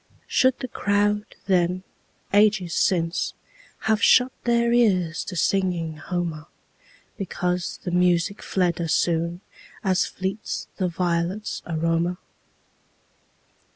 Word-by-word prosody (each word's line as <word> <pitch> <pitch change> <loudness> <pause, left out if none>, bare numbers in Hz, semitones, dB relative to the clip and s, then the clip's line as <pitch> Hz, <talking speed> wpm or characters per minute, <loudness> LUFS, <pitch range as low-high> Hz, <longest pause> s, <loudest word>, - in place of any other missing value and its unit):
Should 260 -1 +3
the 255 - -5
crowd 205 -1 0
then, 180 -1 +1 0.5
ages 205 -4 +3
since, 165 -2 +1 0.5
Have 220 0 +1
shut 250 +2 +5
their 235 0 +3
ears 185 -9 +2
to 185 - -6
singing 175 -4 0
Homer, 165 -2 -4 0.7
Because 180 -2 -2
the 180 - -3
music 180 +2 +2
fled 180 -2 0
as 165 0 0
soonAs 175 +2 -1
fleets 190 +3 -4
the 185 - +1
violets' 175 +3 -1
aroma? 165 +2 0
180 Hz, 100 wpm, -24 LUFS, 170-205 Hz, 0.7 s, shut